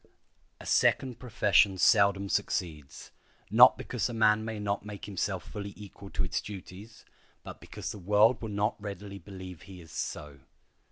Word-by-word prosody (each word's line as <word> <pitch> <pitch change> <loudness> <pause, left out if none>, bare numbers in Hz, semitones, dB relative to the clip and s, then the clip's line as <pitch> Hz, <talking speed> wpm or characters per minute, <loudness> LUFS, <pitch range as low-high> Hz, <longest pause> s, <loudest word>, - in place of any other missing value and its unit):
A - - -11
second 130 -4 +2
profession 100 -5 +3
seldom 100 +1 +4
succeeds, 85 -9 -3 0.4
not - - +8
because - - -3
a 120 - -5
man 110 -1 +3
may 110 0 -5
not 100 -1 -2
make 105 -1 -8
himself 95 -2 -3
fully 100 -1 -7
equal 100 0 -11
to 95 - -2
its 90 - -2
duties, 100 +2 -10 0.4
but - - -10
because - - -7
the 105 - -8
world 105 +6 +3
will 110 - -5
not 105 +2 -1
readily 100 -1 -7
believe 95 -2 -10
he 95 -2 -12
is 80 -2 -14
so. 70 -2 -5
100 Hz, 160 wpm, -29 LUFS, 95-105 Hz, 0.4 s, not